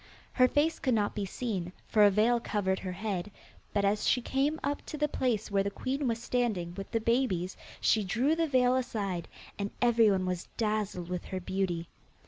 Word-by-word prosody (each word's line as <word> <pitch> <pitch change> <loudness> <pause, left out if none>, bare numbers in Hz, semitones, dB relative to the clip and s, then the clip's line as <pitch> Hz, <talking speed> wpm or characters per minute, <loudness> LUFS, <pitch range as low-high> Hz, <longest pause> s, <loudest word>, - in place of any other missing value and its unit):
Her 255 -1 +5
face 295 +5 +1
could 255 -3 +1
not 205 -2 +1
be 205 -2 -3
seen, 190 -5 -3 0.2
for 215 -2 +4
a 205 - +8
veil 220 +4 +3
covered 195 -4 -1
her 185 - -4
head, 195 -1 -3 0.4
but 200 -1 +1
as 205 +1 +1
she 255 - +4
came 275 +5 0
up 285 +1 -1
to 305 - -5
the 300 0 +2
place 235 -7 -1
where 200 -1 +3
the 200 - 0
queen 270 +6 -2
was 230 -1 0
standing 220 -9 -1
with 195 +1 -7
the 230 - 0
babies 220 -6 0 0.2
she 215 - +3
drew 245 +11 +1
the 330 0 +1
veil 255 -2 +3
aside, 205 -9 -2 0.3
and 200 0 -1
everyone 225 -6 +4
was 180 -1 -3
dazzled 210 -5 -1
with 180 -1 -3
her 185 - -4
beauty. 180 -2 -2
215 Hz, 195 wpm, -30 LUFS, 190-250 Hz, 0.4 s, a